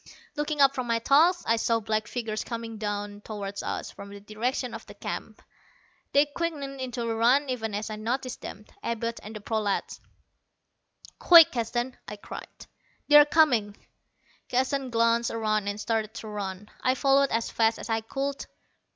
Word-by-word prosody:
Looking 295 0 -1
up 275 0 +6
from 255 -2 -3
my 230 -1 +2
task, 315 +9 +4
I 230 - +3
saw 230 0 +1
black 215 0 -1
figures 220 -3 -3
coming 230 -2 -6
toward 205 -1 -4
us - - -4
from 200 - -10
the 200 0 -10
direction 230 +4 -3
of - - -7
the - - -12
camp. - - -6 0.7
They 285 +1 +5
quickened 285 -3 -4
into 250 -2 -3
a 230 -1 -1
run 250 +6 +3
even 225 -4 -3
as 215 +1 -4
I 215 - -5
noticed 250 +3 -3
them 210 - -8 0.2
Abud 230 0 -3
and 215 +2 -9
the 215 - -7
prolats. 210 -2 -2 1.2
"Quick, 335 -3 +8
Keston," 240 +1 -2
I 210 - -6
cried, 205 - -10 0.4
"they're 295 0 +9
coming." 250 -10 +3 0.7
Keston 265 +1 0
glanced 230 0 +2
around 215 -2 -1
and 205 +1 -3
started 220 0 -2
to 220 - -7
run. 200 -1 -6
I 255 0 +2
followed 275 +1 +3
as 230 0 -1
fast 225 0 +2
as - - -7
I 225 0 +1
could. 275 +5 -4
230 Hz, 165 wpm, -27 LUFS, 215-265 Hz, 1.2 s, they're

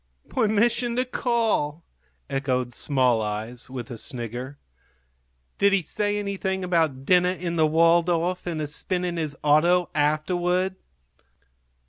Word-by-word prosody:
"Permission 235 +1 +1
to 255 +1 +1
call!" 225 - 0 0.4
echoed 130 -3 -1
small 125 -3 +1
eyes, 110 +4 -4
with 125 -2 -7
a 115 - -6
snigger. 125 +3 -5 1.0
"Did 200 0 +4
he 195 -3 +2
say 205 +5 -1
anything 195 -2 -2
about 160 -7 0
dinner 180 +1 +4
in 175 -2 -3
the 160 -2 +3
Waldorf 170 +2 +2
and 165 -3 -2
a - - -1
spin 180 +5 -2
in 175 -1 -3
his 155 -3 -3
auto 170 +4 +3
afterward?" 175 +5 +1
170 Hz, 125 wpm, -25 LUFS, 140-185 Hz, 1.0 s, Did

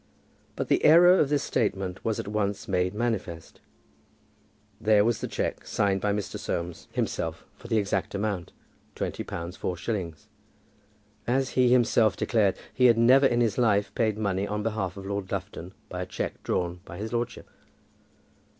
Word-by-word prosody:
But - - -3
the - - +2
error 175 +4 +7
of 145 - +3
this 145 -1 +1
statement 95 -4 -1
was 110 -2 -1
at - - -5
once 100 -1 -2
made 90 0 0
manifest. 105 -8 -3 1.2
There 105 -1 +4
was 115 -1 0
the - - -2
cheque, - - -3
signed 100 -1 +1
by 105 - +1
Mr. 100 0 -3
Soames 85 0 -4
himself, - - -3
for - - -12
the 115 -1 +1
exact 100 -1 -1
amount, 100 -4 -2 0.4
twenty - - -3
pounds 85 +1 -6
four 90 - -3
shillings. 95 -6 -4 1.0
As 130 +2 +1
he 125 -1 +3
himself 120 -3 +3
declared, 105 -5 +1 0.2
he 125 - +3
had 115 -1 +5
never 130 +4 +6
in 120 -1 +1
his 115 -1 +1
life 105 -4 +2
paid 110 -4 0
money 100 -2 -1
on 105 0 -3
behalf 105 -4 -2
of 95 - -8
Lord 100 -1 -4
Lufton - - -5 0.2
by - - -5
a - - -3
cheque - - -4
drawn 90 0 -2
by 85 - -10
his 110 +4 -5
lordship. 120 0 -3
105 Hz, 170 wpm, -27 LUFS, 95-120 Hz, 1.2 s, error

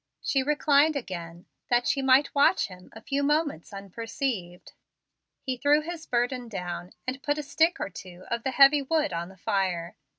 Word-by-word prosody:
She 270 - 0
reclined 295 +1 +3
again, 175 -8 -6 0.2
that 245 0 +2
she 295 -4 +1
might 265 +2 +4
watch 280 -6 +3
him 180 -1 -13
a 225 - -11
few 280 +4 -2
moments 295 - 0
unperceived. 200 -1 -5 0.7
He 260 -2 -3
threw 290 +4 +3
his 330 0 -7
burden 245 0 -1
down, 180 -3 -6
and 260 +1 -4
put 290 +1 -1
a 300 - -3
stick 320 +4 +1
or - - -4
two 180 +1 -11
of 235 0 -1
the 265 - -2
heavy 275 +2 +6
wood 300 - 0
on 170 +1 -4
the 190 - -16
fire. 185 -5 -1
255 Hz, 175 wpm, -27 LUFS, 185-285 Hz, 0.7 s, heavy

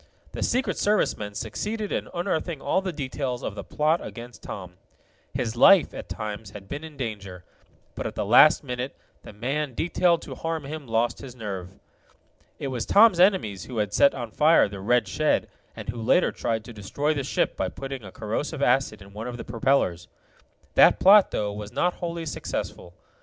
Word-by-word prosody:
The - - -6
Secret 255 +2 0
Service 210 0 +2
men 105 -1 -7
succeeded 205 - -4
in - - -2
unearthing 170 -2 -2
all 190 - 0
the 190 -1 -3
details 130 -4 -4
of - - -3
the 100 - -7
plot 155 +3 0
against 120 0 -9
Tom. 90 -2 -8 0.6
His 115 0 -2
life, 190 +8 +6
at - - -8
times, 105 -2 -5
had 100 -1 -11
been 145 +7 -6
in 155 -3 -10
danger, 100 -7 -6 0.5
but - - -4
at - - -7
the - - -2
last 125 +10 +6
minute 125 0 -4 0.3
the - - -11
man 130 +5 -3
detailed 175 +2 +2
to - - -7
harm 165 -2 -3
him 150 -1 -7
lost 115 +1 0
his 130 -2 -10
nerve. 95 -5 -7 0.8
It 140 - -4
was 125 -3 -3
Tom's 205 -4 +6
enemies 180 - +3
who 125 - -7
had 105 -1 -1
set 140 - +5
on 120 -4 -5
fire 155 +1 +5
the 100 -1 -8
red 115 +2 +2
shed, 155 +11 +1 0.3
and - - -8
who 115 0 -4
later 110 - +3
tried 110 -1 -2
to 120 - -9
destroy 140 +9 -1
the 140 -2 -2
ship 130 - 0
by - - -1
putting 135 -3 -7
a 95 - -10
corrosive 135 - -3
acid 125 -5 +1
in 100 0 -16
one 110 +3 -6
of 120 -1 -5
the - - -7
propellers. 115 -7 0 0.7
That - - +6
plot, 200 +1 +7
though, 105 -1 -2
was 105 0 -7
not 180 0 +1
wholly 170 -2 -4
successful. 90 - -5
125 Hz, 190 wpm, -25 LUFS, 105-155 Hz, 0.8 s, plot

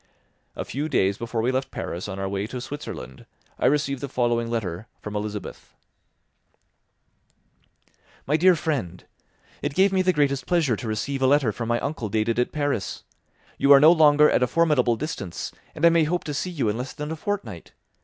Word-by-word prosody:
A - - -4
few 150 +4 -3
days 100 -8 +1
before 115 -1 -2
we 125 - +2
left 130 +1 -2
Paris 85 +4 -5
on 95 -1 -6
our 95 0 -3
way 100 +1 -3
to 125 - -6
Switzerland, 120 - -8 0.3
I - - +3
received 140 -2 +1
the 140 - -4
following 120 -2 0
letter 105 -4 -3
from 105 0 -7
Elizabeth: 105 0 -6 2.5
"My 145 - +1
dear 180 +3 +5
Friend, 130 - -3 0.6
"It 145 -1 -3
gave 195 +1 +4
me 190 - +3
the 185 0 +3
greatest 140 -4 0
pleasure 165 -9 +2
to 115 - -7
receive 130 +6 -2
a 130 - +4
letter 135 -4 +3
from 115 +2 -5
my 120 0 +1
uncle 140 -7 -3
dated 110 +3 0
at 125 - 0
Paris; 145 -8 -2 0.6
you 140 - +4
are 140 - +10
no 155 +3 +8
longer 150 -2 +6
at - - +2
a 125 - +3
formidable 135 -5 +2
distance, 125 - -5 0.2
and 160 +1 +1
I - - +9
may 165 -1 +3
hope 175 +3 -1
to 150 - -4
see 165 +6 -2
you 150 -10 -2
in 105 +3 -1
less 130 +2 -5
than 150 0 -5
a - - -2
fortnight. 150 - -5
135 Hz, 195 wpm, -24 LUFS, 110-150 Hz, 2.5 s, are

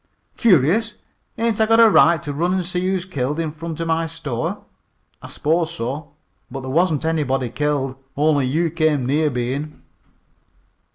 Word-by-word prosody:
"Curious! 205 - +3 0.4
Ain't 225 -1 0
I 220 - +3
got 225 +1 +4
a 230 - +8
right 170 -5 +4
to 145 - -4
run 175 +6 0
an' 185 - 0
see 180 +1 -3
who's 190 -1 -1
killed 145 -3 -3
in 160 -2 -2
front 160 +1 -7
of 165 - -2
my 165 0 0
store?" 150 -7 -4 0.6
"I - - -9
s'pose 165 +2 -1
so. 140 +4 -5 0.4
But 135 - -6
there 130 0 -6
wasn't 160 -1 +1
anybody 135 -6 0
killed; 140 -2 -1 0.2
only 145 -2 +2
you 160 +5 0
came 155 -5 +1
near 150 +4 +1
being." 130 +4 -4
155 Hz, 165 wpm, -21 LUFS, 140-170 Hz, 0.6 s, a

